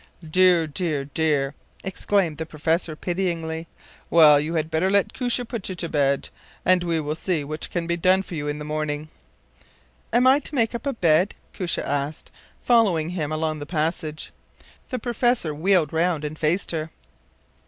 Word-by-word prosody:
” 160 -3 -15
“Dear, 180 -2 +5
dear, 150 -2 -2
dear!” 145 -2 0 0.3
exclaimed 190 -4 0
the 160 - -2
professor, 160 +1 -1
pityingly. 165 -2 -2 0.4
“Well, 150 -3 +7
you 155 +3 -2
had 160 0 -1
better 160 +4 +1
let 200 0 +2
Koosje 245 -1 -1
put 225 -6 -4
you 185 - -4
to 170 -1 -3
bed, 140 -3 +1 0.4
and 185 -1 +4
we 170 -2 0
will 150 0 -2
see 160 -1 -1
what 155 +2 -4
can 175 -2 -2
be 170 0 -1
done 185 +2 +3
for 185 - -10
you 150 -3 -3
in 145 0 -2
the 150 - -6
morning.” 155 0 -3 1.0
“Am 245 +2 +4
I 265 +2 +6
to 295 - -6
make 230 -3 +2
up 235 +4 -4
a 275 - 0
bed?” 175 -2 +2 0.2
Koosje 180 -4 -2
asked, 145 +2 -3 0.3
following 195 -10 +3
him 160 -4 -3
along 155 0 -1
the 145 - -7
passage. 155 -1 -2 0.6
The 255 - -2
professor 240 -7 0
wheeled 170 +1 +2
round 165 -1 +1
and 150 +1 -4
faced 165 +5 0
her. 160 -1 -3
165 Hz, 175 wpm, -24 LUFS, 155-185 Hz, 1.0 s, Well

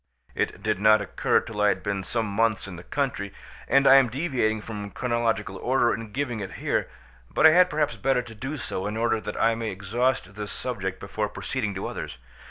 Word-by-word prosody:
It - - -2
did - - 0
not 110 +1 +6
occur 100 -4 +1
till 105 -2 -5
I 105 - +5
had - - +1
been 100 -2 -1
some 115 +3 -1
months 110 +1 0
in 95 - -7
the 85 - -9
country, 125 -8 -2 0.4
and 135 0 +4
I 135 0 +9
am 130 -3 +5
deviating 125 -6 0
from 105 -2 -6
chronological 115 -5 -1
order 120 +2 +2
in 115 -1 -6
giving 125 -2 -2
it 95 -2 -6
here; - - -1 0.4
but - - +2
I 160 - +10
had 180 +2 +6
perhaps 150 -2 0
better 135 -2 +1
do 130 +6 -6
so 95 -7 -3
in 105 +1 -3
order 115 -1 +1
that 105 - -5
I 115 +1 +4
may 115 -1 -3
exhaust 105 +2 -1
this 105 0 -6
subject 95 -7 -4
before 105 +1 -3
proceeding 110 -2 -3
to 95 - -4
others. - - -5
110 Hz, 205 wpm, -26 LUFS, 100-130 Hz, 0.4 s, I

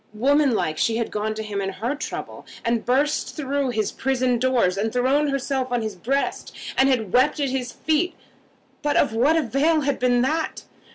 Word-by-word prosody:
Womanlike 255 - +2
she 225 -1 +1
had 230 - -2
gone 215 +1 -2
to 220 - -4
him 205 -2 -3
in 195 0 -3
her 230 +8 -2
trouble, 295 - -6 0.2
had 230 -1 -1
burst 280 +4 +1
through 280 -2 -1
his 220 -3 -1
prison 255 -2 0
doors, 240 -8 +2
had 215 +3 -1
thrown 265 +5 +2
herself 270 -2 -1
on 240 -2 0
his 215 -2 -4
breast, 270 +10 -2 0.2
and 265 +1 +4
had 225 -7 0
wept 275 +5 +3
at 280 -2 0
his 250 -2 -2
feet. 320 +3 0 0.7
But 295 -1 +1
of 225 - +2
what 265 +8 +3
avail 305 +3 +2
had 280 -1 -1
been 245 -1 +3
that? 315 +4 -1
255 Hz, 185 wpm, -23 LUFS, 225-280 Hz, 0.7 s, and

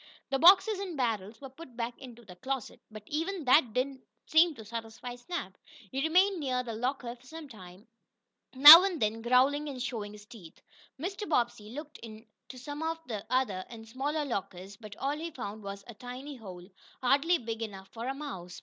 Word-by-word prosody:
The 270 - +1
boxes 380 +5 +6
and 370 -6 -5
barrels 220 -4 -2
were 270 - -9
put 265 -4 -13
back 235 0 -3
into 240 -3 -12
the 180 -2 -12
closet, 260 +5 -5
but 215 -1 -11
even 330 +2 -3
that 255 -2 +5
did 250 +4 +1
not 270 -1 -12 0.3
seem 320 0 +4
to 220 - -11
satisfy 230 +2 -7
Snap. 245 - -6 0.4
He 270 - -2
remained 365 +5 +3
near 255 -4 -1
the 235 -2 -6
locker 245 +1 -3
for 250 +1 -21
some 320 +1 -9
time, 190 -5 -14 0.7
now 300 +6 +12
and 375 -5 -1
then 220 +1 -1
growling 265 +5 +2
and 265 -3 -7
showing 225 -5 -4
his 210 -1 -13
teeth. 190 -8 -14 0.4
Mr. 390 +6 -5
Bobbsey 240 -7 0
looked 300 +5 -9
in 220 0 -11 0.3
some 290 +4 -8
of 325 0 -2
the 215 -4 -5
other, 245 -8 0
and 225 -1 -11
smaller, 290 +6 -2
lockers, 195 -5 -5
but 210 -1 -11
all 280 +2 -1
he 335 +1 -4
found 220 -8 -7
was 200 0 -7
a 235 - -10
tiny 255 +6 -9
hole, 185 -7 -11 0.4
hardly 285 +7 +3
big 230 -3 -6
enough 195 -3 -7
for 230 +1 -7
a 270 - -2
mouse. 190 -12 -8
250 Hz, 195 wpm, -30 LUFS, 220-290 Hz, 0.7 s, now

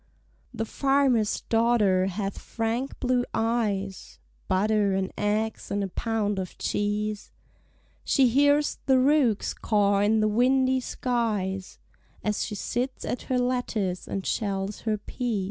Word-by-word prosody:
The 225 - -3
farmer's 270 -4 +2
daughter 225 -5 +2
hath 195 +1 -3
frank 230 +4 -3
blue 250 -1 +1
eyes; 210 -4 -1 0.3
(Butter 205 0 +2
and 190 -1 -2
eggs 215 +1 -1
and 200 0 -1
a 195 - -3
pound 210 -1 -1
of 185 -1 -6
cheese) 210 0 -2 0.7
She 265 -2 +4
hears 285 +4 +3
the 265 -1 +5
rooks 255 -5 +2
caw 205 -2 +2
in 210 +2 +3
the 215 - +3
windy 260 +4 +3
skies, 215 -7 -2 0.5
As 210 0 0
she 210 - -4
sits 245 +6 -3
at 245 - -4
her 255 - +2
lattice 245 -7 -1
and 195 - -4
shells 200 -1 -2
her 220 -2 -1
peas. 230 +1 -3
220 Hz, 130 wpm, -26 LUFS, 200-245 Hz, 0.7 s, the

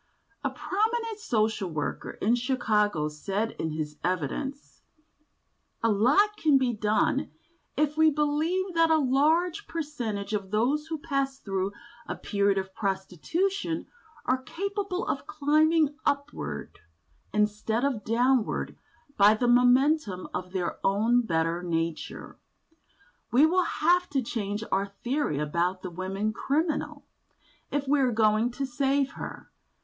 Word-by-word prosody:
A - - +1
prominent 445 +2 -1
social 220 - 0
worker 155 -3 -4
in 225 - +4
Chicago 215 - +1
said 195 +9 -2
in 160 - -1
his 155 -1 -4
evidence: 185 - -3 1.0
"A 230 - +4
lot 295 - +3
can 300 -7 +4
be 255 -2 +1
done, 215 0 +1 0.5
if 300 0 +1
we 315 0 +6
believe 310 +6 0
that 330 -1 +4
a 320 - +5
very 285 -4 +1
large 330 +8 +2
percentage 235 -11 -4
of 200 -2 -2
those 260 +9 +1
who 320 0 -3
pass 275 -3 -2
through 195 -2 -2 0.3
a - - -3
period 200 -1 +1
of 190 0 -3
prostitution 325 - -2 0.4
are 260 0 +1
capable 395 - -3
of - - -3
climbing 310 +1 +3
upward 75 - -3 0.5
instead 210 +3 0
of 255 -7 -1
downward 245 +2 +1 0.4
by 205 +2 +7
the 245 +3 0
momentum 245 - +3
of 180 0 -4
their 180 -2 -2
own 225 +5 +3
better 165 -4 0
nature. 165 -2 -3 0.9
We 265 +6 +6
will 360 +2 +3
have 355 +3 +2
to 275 -3 0
change 210 -2 -3
our 195 +1 +1
theory 240 - -2
about 170 +5 -1
the 185 - -5
woman 195 +4 -2
criminal, 300 +6 -1 0.6
if 285 -1 -2
we 290 +1 +3
are 260 -2 +3
going 215 +1 +3
to 275 - -2
save 270 +1 +1
her. - - -8
245 Hz, 135 wpm, -27 LUFS, 200-300 Hz, 1.0 s, by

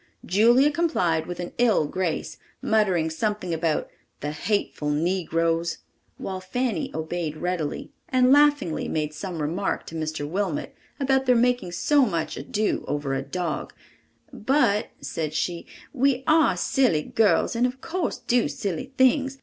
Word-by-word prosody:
Julia 240 +9 +5
complied 185 - 0
with 175 0 -6
an 175 - -4
ill 225 -10 +4
grace, 175 +1 -3 0.2
muttering 185 -7 +1
something 185 +1 -2
about 160 -1 0 0.3
"the 145 - -2
hateful 155 -2 -2
negroes," 165 +1 0 0.4
while 190 -1 -5
Fanny 220 -1 -2
obeyed 160 -1 -3
readily, 175 -3 -3 0.2
and 255 0 +4
laughingly 290 - +3
made 155 -1 -2
some 175 +2 -5
remark 175 +7 -2
to - - -10
Mr. 155 -2 -3
Wilmot 185 -1 -2 0.3
about 265 -1 +1
their 250 - +5
making 240 -6 +1
so 285 +10 +3
much 170 -5 -2
ado 205 +10 -1
over 145 -1 -2
a 135 - -1
dog, 160 +4 -4 0.6
"but," 240 -3 +2
said 150 +3 -4
she, 170 +1 -2 0.3
"we 265 -1 +2
are 315 -1 +4
silly 245 - +2
girls, 210 -1 +2
and 240 +2 +3
of 255 +1 -7
course 350 +3 -2
do 240 -5 +1
silly 195 - -4
things. 270 +1 +3
185 Hz, 140 wpm, -25 LUFS, 160-250 Hz, 0.6 s, Julia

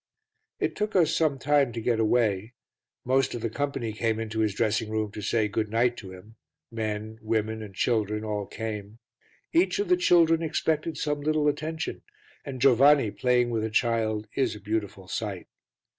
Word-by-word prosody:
It - - -1
took 210 0 -2
us 165 -4 +4
some 155 -4 +2
time 140 -1 +2
to 115 - -4
get 115 0 0
away; 110 -1 +1 0.5
most 130 +1 +2
of 120 - -5
the 115 - -2
company 135 -4 -2
came 110 0 -1
into 110 0 -4
his 105 -2 +1
dressing 110 0 0
room 110 -1 -2
to 105 - -7
say 110 +2 +1
"Good 105 +1 -2
night" 120 +2 +2
to 95 -3 -9
him, 100 +5 -14 0.3
men, 110 -1 -4
women 110 0 -1
and 100 -3 -9
children 105 -1 0
all 105 -2 -3
came; 105 -1 -6 0.6
each 345 +3 +3
of 410 -1 -1
the 360 - +5
children 170 - +4
expected 160 0 -1
some 150 -1 -1
little 155 0 +1
attention, 160 +2 -2 0.4
and 135 -3 -6
Giovanni 135 -1 +5
playing 125 0 +1
with 110 -2 -1
a 110 - -1
child 110 -2 0
is 125 -5 0
a - - -9
beautiful 105 -2 -4
sight. 105 -6 -4
115 Hz, 175 wpm, -27 LUFS, 110-140 Hz, 0.6 s, the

